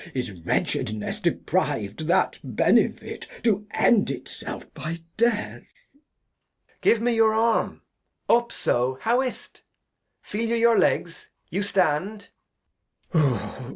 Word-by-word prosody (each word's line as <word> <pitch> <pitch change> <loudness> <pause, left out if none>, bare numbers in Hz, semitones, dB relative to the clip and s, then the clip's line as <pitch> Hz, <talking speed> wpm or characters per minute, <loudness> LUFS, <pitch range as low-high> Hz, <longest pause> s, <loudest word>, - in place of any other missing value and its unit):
Is 125 -5 -2
Wretchedness 105 +4 -2
depriv'd 105 +10 -1
that 180 +2 +2
Benefit - - +1 0.2
To 210 -3 +1
End 220 - +3
it 135 - -5
self - - -8
by 165 +1 -5
Death? 225 -2 -1
Edg. 305 - -35
Give 230 - +4
me 240 +1 +2
your 220 -1 +4
Arm. 225 +1 +1 0.4
Up; 235 0 +3
so, 125 +2 0
how 240 +3 +2
is't? 255 -2 -6 0.6
Feel 225 +2 -3
you 235 - +1
your 230 0 +4
Legs? 170 -1 0 0.2
You 195 - -1
stand. 195 +1 0
210 Hz, 115 wpm, -25 LUFS, 155-235 Hz, 0.6 s, Give